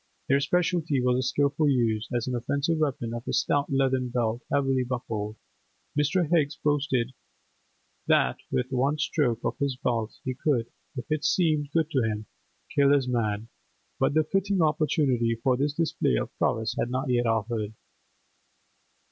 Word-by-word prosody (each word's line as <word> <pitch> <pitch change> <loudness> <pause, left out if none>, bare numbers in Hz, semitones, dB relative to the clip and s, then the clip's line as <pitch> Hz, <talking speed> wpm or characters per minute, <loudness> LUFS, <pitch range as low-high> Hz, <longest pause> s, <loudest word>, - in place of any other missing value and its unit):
Their 140 +1 +4
speciality 165 -1 +1
was 125 0 +2
the - - +1
skilful 140 +3 +1
use, 115 -5 +1
as 120 -2 -1
an 130 - -3
offensive 140 +6 0
weapon, 130 -6 -1
of 120 +1 -6
a - - -2
stout 145 0 +1
leathern 130 -2 +1
belt 120 -1 -1
heavily 135 -2 +2
buckled; 110 -4 -4 0.6
Mr. 150 +4 +2
Higgs 150 -3 +2
boasted 135 -4 0 0.9
that - - +3
with 125 +1 -1
one 135 +4 +1
stroke 125 -7 0
of - - -2
his 140 -2 0
belt 115 -4 -1
he 130 - -2
could, 125 -3 0 0.3
if 125 - -4
it 155 -1 0
seemed 155 -5 +2
good 160 0 +1
to 135 - +2
him, 110 -1 -2 0.5
kill 140 -1 +4
his 140 -3 +3
man, 110 -3 -1 0.5
but - - +2
the 155 - +4
fitting 195 +4 0
opportunity 145 -7 +2
for 125 +3 +1
this 145 +3 -1
display 165 - +1
of - - -3
prowess 110 0 +1
had 120 - 0
not 130 +1 -1
yet 120 -1 +2
offered. 110 -1 -1
130 Hz, 160 wpm, -27 LUFS, 120-145 Hz, 0.9 s, Their